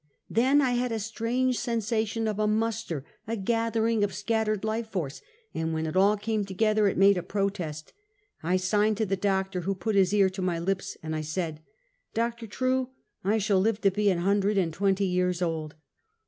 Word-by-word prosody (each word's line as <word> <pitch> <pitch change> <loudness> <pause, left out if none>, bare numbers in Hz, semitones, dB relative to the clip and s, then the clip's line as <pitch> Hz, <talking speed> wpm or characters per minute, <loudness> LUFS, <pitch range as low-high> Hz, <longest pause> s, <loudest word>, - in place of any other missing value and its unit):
" - - -53
Then 265 +5 +4
I 255 - +2
had 245 0 0
a 225 - -1
strange 230 +4 -1
sensation 225 -1 -1
of 215 -1 -2
a 215 - +2
muster, 215 -9 -1 0.2
a 225 +1 -2
gathering 225 +1 +1
of 195 -2 -1
scattered 215 0 0
life 220 +1 -2
force, 165 -10 -4 0.3
and 160 0 -2
when 160 0 -1
it 155 - -4
all 200 +3 +4
came 215 0 -1
together 210 +2 +2
it 195 - 0
made 195 0 +5
a - - -3
protest; 185 -6 -3 0.5
I 180 +3 +1
signed 210 +3 +2
to 220 - +1
the 195 -1 0
doctor, 190 -1 0
who 195 +3 -1
put 200 +4 -2
his 195 -2 +4
ear 200 -2 +4
to 190 0 -5
my 180 -2 0
lips, 190 +3 -2
and 155 0 -3
I 155 - -2
said: 155 0 -3 0.5
"Doctor 230 0 -1
True, 255 +4 0 0.3
I 205 +4 +2
shall 205 -2 +2
live 215 +2 +1
to 195 - +4
be 205 +1 +2
an 185 - +2
hundred 200 +3 +1
and 170 -4 +1
twenty 195 +2 +1
years 180 -1 0
old 160 -4 -2
200 Hz, 200 wpm, -27 LUFS, 185-225 Hz, 0.5 s, made